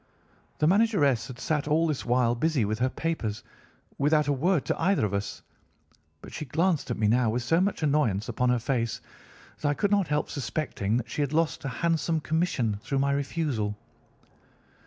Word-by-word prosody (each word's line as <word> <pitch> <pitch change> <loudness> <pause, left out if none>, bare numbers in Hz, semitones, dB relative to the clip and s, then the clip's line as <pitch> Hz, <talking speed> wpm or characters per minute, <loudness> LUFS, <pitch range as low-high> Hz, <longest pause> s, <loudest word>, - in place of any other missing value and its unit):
"The - - +1
manageress 170 - +3
had 130 - -9
sat 150 +1 -1
all 155 +2 +3
this 155 -4 -1
while 120 -1 +2
busy 135 -1 +1
with 110 +2 -2
her 130 +1 +2
papers 130 -9 -3 0.6
without 150 +2 +3
a 145 - +2
word 160 +3 +1
to - - -2
either 185 - +2
of 100 - -3
us, 100 0 -3 0.8
but - - -11
she - - -4
glanced 160 +2 0
at 120 - -2
me 105 -1 +2
now 120 +1 +3
with 120 +2 -1
so 165 +8 +2
much 190 -4 -1
annoyance 140 -9 +1
upon 125 +1 0
her 125 - +3
face 115 -2 -1 0.6
that 150 - 0
I 145 - +1
could 205 +5 0
not 200 -4 +3
help 150 0 0
suspecting 120 -5 -2
that 120 -2 -4
she - - -2
had 145 0 -1
lost 160 -2 0
a - - -1
handsome 165 +3 0
commission 150 - 0
through 135 +5 -2
my 140 +1 +2
refusal. 140 -7 -1
140 Hz, 190 wpm, -27 LUFS, 120-160 Hz, 0.8 s, manageress